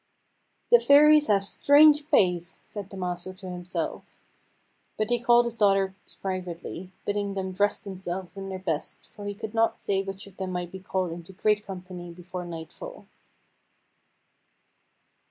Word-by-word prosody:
"The 480 - +9
Fairies 300 -1 +7
have 200 -2 +3
strange 295 +7 +5
ways," 180 -1 +2
said 205 -2 -7
the 195 - -9
master 180 0 -4
to 185 0 -9
himself. 180 0 -5 0.8
But 215 +2 -1
he 240 - +3
called 240 0 +5
his 235 -1 -3
daughters 195 -2 +3 0.3
privately, 185 -1 -5
bidding 205 -1 -1
them 190 -1 -2
dress 205 +2 +2
themselves 185 -2 -6
in 195 0 -6
their 190 - -4
best, 165 -5 -3
for 205 - -11
he 205 - -4
could 220 +1 -6
not 225 0 +2
say 195 -1 0
which 195 0 -7
of 200 -2 -16
them 190 -1 -3
might 175 -1 -3
be 190 - -7
called 185 -2 -2
into 170 +2 -9
great 210 +2 +1
company 180 -2 -8
before 180 +1 -7
nightfall. 175 - -8
190 Hz, 155 wpm, -27 LUFS, 180-210 Hz, 0.8 s, The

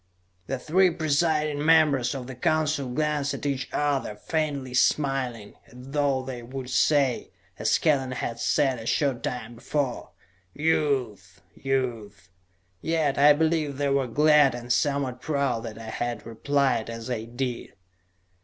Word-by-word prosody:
The 135 - -2
three 180 +7 +3
presiding 155 -2 0
members 155 -5 +4
of 130 -2 -5
the 130 - -7
Council 150 -1 0
glanced 150 +1 -1
at - - -8
each 135 -3 -2
other, 140 -7 -1
faintly 140 0 -3
smiling, 130 -5 0
as - - -18
though 140 -2 +1
they 130 -2 -6
would 130 +1 -7
say, 140 -5 +2 0.3
as - - +2
Kellen 135 -5 +1
had 120 -1 -4
said 130 +1 +1
a 115 - -8
short 135 -3 0
time 120 -2 -4
before: 130 +2 -3 0.5
"Youth! 125 - -1
Youth!" 115 -9 -3 0.5
Yet 160 -4 0
I 145 +1 +8
believe 155 -2 0
they 145 0 0
were 135 -2 +1
glad 150 +1 +4
and 120 0 -2
somewhat 140 -3 0
proud 140 -6 -1
that 110 -1 -7
I 110 -1 -7
had 120 +1 -4
replied 130 +1 0
as 115 0 -6
I 110 -2 -3
did. 120 +1 -4
135 Hz, 145 wpm, -26 LUFS, 120-150 Hz, 0.5 s, I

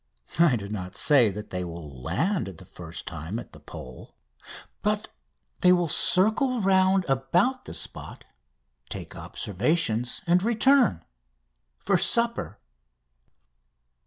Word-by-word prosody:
I 170 -7 +5
do 100 -3 -5
not 95 -3 -6
say 135 -7 +5
that 105 +2 -8
they 90 0 -3
will 80 -6 -9
land 165 - -1
the 95 -1 -11
first 85 -1 -9
time 85 +4 -5
at 120 - -8
the - - -13
Pole, 65 0 -11 0.7
but - - -1 0.5
they 180 - +5
will 175 -1 +3
circle 220 - +3
round 190 -1 +3
about 175 - +1
the - - -7
spot, - - -7 0.6
take - - -7
observations, 120 - -1
and 175 +1 +3
return... 235 - +3 0.7
for - - +1
supper. 235 0 +1
135 Hz, 120 wpm, -26 LUFS, -, 0.7 s, I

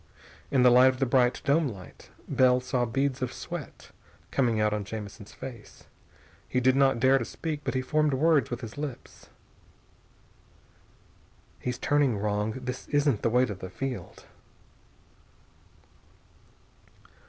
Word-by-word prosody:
In 130 -3 +3
the 125 - +7
light 125 +1 +7
of 130 0 +2
the 135 - +1
bright 125 0 +2
dome 145 +2 +3
light, 100 -7 -11 0.2
Bell 125 -1 +4
saw 125 -1 -1
beads 135 +3 -1
of 130 - -2
sweat - - -8 0.4
coming 120 -5 +1
out 105 0 +2
on 105 -1 -2
Jamison's 105 0 -8
face. 120 -5 -10 0.7
He 125 - +1
did 130 +1 +3
not 135 -3 +3
dare 130 +2 +4
to - - -2
speak, 155 -3 -5
but 135 -1 -3
he 130 - 0
formed 150 +1 +1
words 155 +1 +3
with 120 0 -5
his 115 +3 -8
lips. 145 -5 -8 2.3
"He's 125 -1 -3
turning 145 -6 +2
wrong! 105 +1 -1
This 125 0 -6
isn't 145 -6 +1
the - - +1
way 125 +2 +3
to 105 - -4
the 95 -1 -8
field!" 130 +7 -6
125 Hz, 140 wpm, -27 LUFS, 115-135 Hz, 2.3 s, the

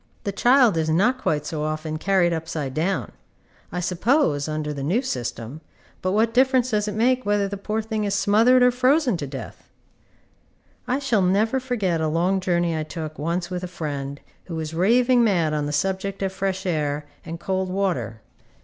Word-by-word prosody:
The 200 - -2
child 240 -2 +4
is 160 -1 0
not 215 +11 +2
quite 150 -1 0
so 155 0 -4
often 155 0 -3
carried 180 0 +2
upside 160 -4 -4
down. 155 - -1 0.6
I 180 - -3
suppose, 180 - +1
under 155 -1 -3
the 140 - -6
new 185 - 0
system, 125 - -5 0.4
but 185 +1 0
what 225 +2 +2
difference 255 0 +3
does 210 -1 +1
it 210 - -3
make 250 +3 +2
whether 205 -1 +1
the 200 - -5
poor 215 +2 -3
thing 220 -1 -2
is 200 -1 0
smothered 230 +6 +4
or 250 - +6
frozen 255 - +2
to 145 - -5
death? 135 -4 -9 1.2
I 255 +3 0 0.2
never 210 +7 +2
shall 260 - -16
forget 190 -10 0
a 160 - +1
long 175 +5 +1
journey 175 -2 0
I 155 - -1
took 155 -1 -6
once 170 +3 -2
with 180 0 -3
a - - -3
friend 145 -5 -5 0.3
who 170 - -6
was 160 0 -4
raving 240 +8 +4
mad 170 -8 +2
on 150 -1 -1
the - - -3
subject 190 +5 -2
of 190 -1 -2
fresh 190 0 -2
air 150 -4 -1 0.2
and 165 +1 -7
cold 190 0 -2
water. 150 - -2
185 Hz, 185 wpm, -23 LUFS, 155-215 Hz, 1.2 s, or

